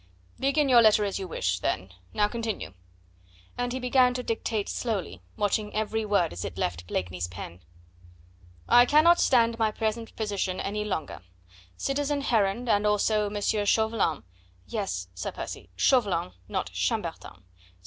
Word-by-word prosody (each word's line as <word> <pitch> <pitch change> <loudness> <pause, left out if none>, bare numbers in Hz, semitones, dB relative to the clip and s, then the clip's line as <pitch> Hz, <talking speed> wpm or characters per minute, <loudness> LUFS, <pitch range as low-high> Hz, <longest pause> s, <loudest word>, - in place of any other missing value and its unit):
"Begin 280 +2 +2
your 245 -3 +7
letter 215 -1 +5
as 200 0 -2
you 190 - -5
wish, 90 - -1
then; 90 +1 -2 0.2
now 210 - +2
continue." 225 - -4 0.8
And 245 0 -2
he 260 - -3
began 250 0 +3
to 250 - -3
dictate 220 -2 -2
slowly, 195 - -3 0.2
watching 210 +1 -1
every 215 +1 -1
word 200 -5 +1
as 85 - -5
it 90 -2 -6
left 85 -2 -2
Blakeney's 90 -1 -3
pen. 90 -1 -9 1.1
"'I 245 0 +7
cannot 320 +5 +6
stand 230 -2 +3
my 220 -1 +3
present 220 +1 -3
position 200 -4 -2
any 210 +1 -2
longer. 185 - -4 0.6
Citizen 285 +1 -1
Heron, 225 -2 +1
and 210 -2 +3
also 210 0 +2
M. 205 0 -4
Chauvelin 215 -5 +1 0.2
' 90 0 -32
Yes, 190 - -2
Sir 90 - -4
Percy, - - -7
Chauvelin, 195 - +2 0.2
not - - -3
Chambertin - - -3
210 Hz, 150 wpm, -27 LUFS, 180-235 Hz, 1.1 s, your